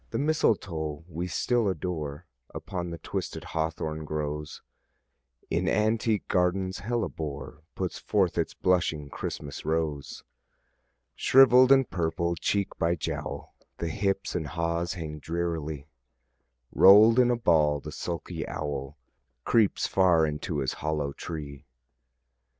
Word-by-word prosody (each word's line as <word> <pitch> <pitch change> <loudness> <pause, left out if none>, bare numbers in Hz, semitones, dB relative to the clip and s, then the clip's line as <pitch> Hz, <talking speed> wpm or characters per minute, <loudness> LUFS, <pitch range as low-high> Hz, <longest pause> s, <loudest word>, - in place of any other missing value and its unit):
The - - -3
mistletoe 85 - 0
we 85 +1 -4
still 115 +6 +1
adore 80 -4 -4 0.3
Upon 90 0 -4
the 85 - -6
twisted - - -5
hawthorn 80 -1 -3
grows: 75 0 -4 0.9
In - - +1
antique 110 0 +1
gardens 95 +1 0
hellebore 80 -10 -4
Puts 95 -2 -3
forth 95 -5 +1
its - - -1
blushing 80 -5 +1
Christmas 70 -1 -6
rose. 80 -3 -2 0.9
Shrivell'd 130 0 +6
and 135 -2 +6
purple, 85 0 -1
cheek 95 +5 -1
by 85 0 +2
jowl, 80 - -5 0.2
The 85 - -3
hips 95 +3 -1
and 80 -4 -2
haws 85 +1 -1
hang 80 -4 -6
drearily; 80 -3 -3 0.9
Roll'd 110 +5 +7
in 125 -1 +5
a 120 - +2
ball 75 -8 +3
the 75 +2 -8
sulky 85 +2 -5
owl 70 0 -4 0.5
Creeps 110 -4 +3
far 90 -4 +4
into 75 +1 -3
his 65 - -1
hollow 75 -2 -1
tree. 75 -2 -7
85 Hz, 120 wpm, -27 LUFS, 75-95 Hz, 0.9 s, Roll'd